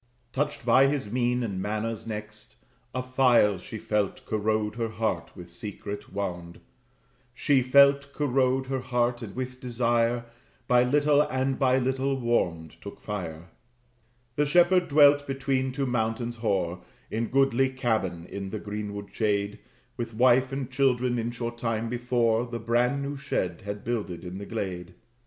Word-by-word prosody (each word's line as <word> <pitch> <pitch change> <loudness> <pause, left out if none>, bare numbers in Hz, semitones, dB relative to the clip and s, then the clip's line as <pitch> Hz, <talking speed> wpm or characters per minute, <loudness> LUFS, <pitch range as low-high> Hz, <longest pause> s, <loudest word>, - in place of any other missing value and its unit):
Touched 145 -3 -2
by 130 +3 +6
his 135 -7 -2
mien 125 0 +1
and 100 -5 -3
manners 110 +2 -3
next, 105 -1 -7 0.4
a 130 +1 -3
file 125 -6 +3
She 110 - -8
felt 105 -2 -1
corrode 110 0 0
her 115 0 -2
heart 110 0 -2
with 90 -1 -9
secret 100 +3 -7
wound; 90 -3 -5 0.8
She 140 -1 +3
felt 140 +2 +5
corrode 130 -2 +1
her 135 0 -2
heart, 120 -1 0
and 105 -4 -8
with 130 0 -5
desire, 120 -1 +1 0.4
By 125 0 +5
little 145 +3 +3
and 130 -1 -1
by 130 -2 +4
little 135 +1 0
warmed, 85 -10 -1
took 100 - -9
fire. 85 -5 -6 0.9
The 150 - +3
shepherd 175 +3 +4
dwelt 145 0 +5
between 135 -1 -1
two 135 +1 -2
mountains 120 -1 -1
hoar, 90 -5 -1 0.3
In 115 +1 -1
goodly 135 0 +3
cabin, 110 -10 -1
in 95 +1 -6
the 110 - -4
greenwood 105 -1 -6
shade, 105 -1 0 0.4
With 115 -2 -5
wife 125 +2 +4
and 135 -1 -4
children; 125 -2 +1
in 115 +1 -1
short 120 0 -5
time 115 -1 -1
before, 120 -1 +1
The 120 0 -4
brand 120 +5 +1
new 140 +1 -4
shed 90 -10 -2
had 100 0 -5
builded 105 -7 -3
in 90 +1 -6
the 100 - -7
glade. 90 -5 -5
120 Hz, 150 wpm, -27 LUFS, 105-130 Hz, 0.9 s, by